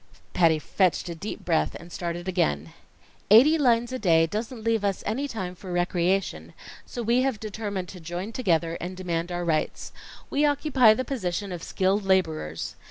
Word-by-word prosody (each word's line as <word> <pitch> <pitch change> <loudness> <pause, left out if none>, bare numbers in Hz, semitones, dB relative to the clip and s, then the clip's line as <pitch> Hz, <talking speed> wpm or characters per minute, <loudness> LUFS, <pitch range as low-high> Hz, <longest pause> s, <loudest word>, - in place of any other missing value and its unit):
Patty 165 -3 +4
fetched 180 +2 0
a - - -3
deep 170 +6 -7
breath 165 -3 +1
and 170 +1 -11
started 175 +1 -4
again. 80 - 0 0.6
"Eighty 255 +10 +8
lines 240 -3 +3
a 255 - -3
day 165 -5 +4
doesn't 220 +6 -5
leave 225 -2 +1
us 200 -2 -1
any 260 +7 -1
time 190 -8 -5
for 185 +1 -9
recreation, 175 +2 0 0.3
so 240 - -5
we 235 +3 +3
have 260 -5 0
determined 205 -3 -4
to 185 - -9
join 175 +5 -5
together 170 -8 0
and 180 +1 -5
demand 175 -1 -2
our 175 0 -2
rights. 160 -2 -1 0.4
We 285 - +1
occupy 275 -6 +4
the 255 - -2
position 200 -6 -3
of 175 -2 -5
skilled 195 +4 0
laborers. 160 - 0
190 Hz, 170 wpm, -26 LUFS, 175-225 Hz, 0.6 s, Eighty